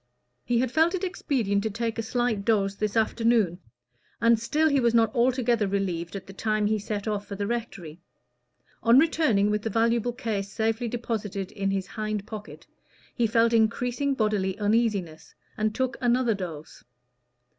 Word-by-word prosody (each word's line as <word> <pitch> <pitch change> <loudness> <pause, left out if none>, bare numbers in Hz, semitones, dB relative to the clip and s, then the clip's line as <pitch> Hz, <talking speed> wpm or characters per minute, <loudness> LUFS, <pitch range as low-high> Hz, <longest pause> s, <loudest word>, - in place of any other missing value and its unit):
He 245 - 0
had 250 0 +1
felt 320 +5 +3
it 375 - -4
expedient 245 - 0
to 220 - -1
take 230 +2 -3
a - - +2
slight 225 -2 -1
dose 200 -3 +1
this 210 +1 -2
afternoon, 225 -5 +2 0.6
and 230 -1 +4
still 300 +8 +1
he 280 -3 +3
was 235 -2 +2
not 225 -1 +3
altogether 240 -3 +2
relieved 190 -3 -2
at 190 -1 -6
the 195 - -11
time 215 +1 0
he 215 +1 +1
set 205 +1 -4
off 205 -1 -2
for 200 - -6
the 200 +1 -3
rectory. 200 -8 -5 0.8
On 235 +2 +5
returning 270 -10 +3
with 210 0 0
the 225 - -3
valuable 230 +2 +1
case 210 -5 -3
safely 225 +2 -1
deposited 215 -5 -4
in 195 -2 -2
his 195 -1 -1
hind 215 0 -4
pocket, 215 -1 -9 0.5
he 235 -2 +1
felt 230 +1 +3
increasing 245 +5 +1
bodily 210 -4 0
uneasiness, 205 -6 -1 0.2
and 215 0 -1
took 260 0 -1
another 245 -1 +2
dose. 170 -6 -7
220 Hz, 165 wpm, -26 LUFS, 200-235 Hz, 0.8 s, On